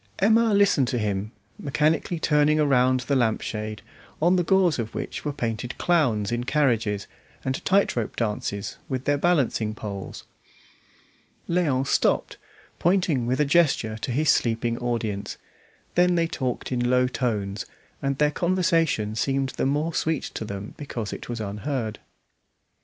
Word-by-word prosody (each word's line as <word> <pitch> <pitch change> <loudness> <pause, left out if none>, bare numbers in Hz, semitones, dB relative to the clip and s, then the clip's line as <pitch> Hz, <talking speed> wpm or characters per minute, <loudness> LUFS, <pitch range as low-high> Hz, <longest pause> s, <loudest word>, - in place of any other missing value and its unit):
Emma 225 +3 +4
listened 200 -10 +4
to 125 - -1
him, 105 -1 -2 0.3
mechanically 155 +4 0
turning 150 -1 +3
around 130 -3 +3
the 140 +2 -1
lampshade, 110 -3 -1 0.4
on 175 +4 +4
the 180 - +3
gauze 180 -4 +3
of 115 -1 -4
which - - -5
were 150 - -1
painted 120 -2 -4
clowns 125 - +1
in 120 0 -1
carriages, 115 -8 +1 0.4
and 130 0 -2
tight 195 +1 +3
rope 115 -3 -2
dances 105 -3 -3
with 130 -1 -3
their 145 0 +2
balancing 135 -10 +1
poles. 100 -4 -7 1.2
Léon 155 -7 +1
stopped, - - +1 0.4
pointing 170 -9 +2
with 130 +3 0
a 150 - +4
gesture 140 -8 +2
to 110 - -5
his 150 +5 +3
sleeping 115 0 +1
audience; 115 -4 -3 0.6
then 180 0 +4
they 170 -1 +2
talked 130 -7 -3
in 120 -1 0
low 125 0 +4
tones, 105 -6 -2 0.3
and 140 -1 -1
their 150 0 +3
conversation 165 - +1
seemed 135 +4 0
the 130 - -1
more 150 +4 0
sweet 160 -2 0
to - - -5
them 100 -1 -6
because 120 -8 -5
it - - -8
was 120 -1 -3
unheard. 110 +2 -3
130 Hz, 145 wpm, -25 LUFS, 110-155 Hz, 1.2 s, Emma